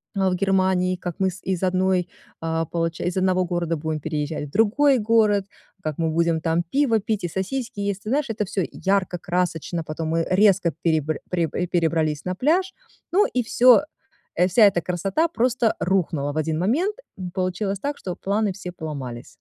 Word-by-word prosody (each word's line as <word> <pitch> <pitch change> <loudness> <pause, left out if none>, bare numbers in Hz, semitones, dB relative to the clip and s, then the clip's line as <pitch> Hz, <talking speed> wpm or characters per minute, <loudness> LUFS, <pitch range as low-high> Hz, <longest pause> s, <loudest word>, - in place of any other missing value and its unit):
а, 190 -1 +2
в 180 - 0
Германии, 185 -1 +2
как 175 -2 -5
мы 190 -1 +2
с 180 - -12
из 190 -1 -2
1, 185 0 +2 0.5
а, 165 0 -1
получа 165 +1 -2
из 180 +1 -1
1 185 -1 +2
города 170 -1 -1
будем 155 0 -3
переезжать 150 0 -3
в 140 - -15
другой 255 +6 +3
город, 210 -3 +3 0.4
как 155 -2 -3
мы 165 -1 0
будем 165 0 +1
там 165 +1 +1
пиво 265 -5 +3
пить 210 -1 -2
и - - 0
сосиски 205 +5 -4
есть. 200 0 -2
Ты 215 - -4
знаешь, 275 -1 0
это 210 -2 -1
всё 190 0 -2
ярко, 190 -2 0
красочно, 175 -1 -2
потом 155 +1 -4
мы 165 0 0
резко 190 -3 +4
перебра 155 -2 +1
пре 170 -3 +1
э, 180 - -1
перебрались 160 -3 0
на 185 0 -2
пляж, 355 - +1 0.4
ну 400 +5 +4
и 250 - 0
всё, 245 +3 +5 0.5
э, 180 +2 +3
вся 190 +6 +2
эта 195 -4 +5
красота 195 - 0
просто 240 -4 +1
рухнула 165 -6 0
в 155 - -5
один 155 +1 0
момент. 315 - +1 0.2
М, 180 -1 -5
получилось 190 +2 -2
так, 285 +4 -3
что 180 -2 -5
планы 205 +1 0
все 180 -1 -7
поломались. 135 -8 -6
185 Hz, 190 wpm, -23 LUFS, 165-210 Hz, 0.5 s, всё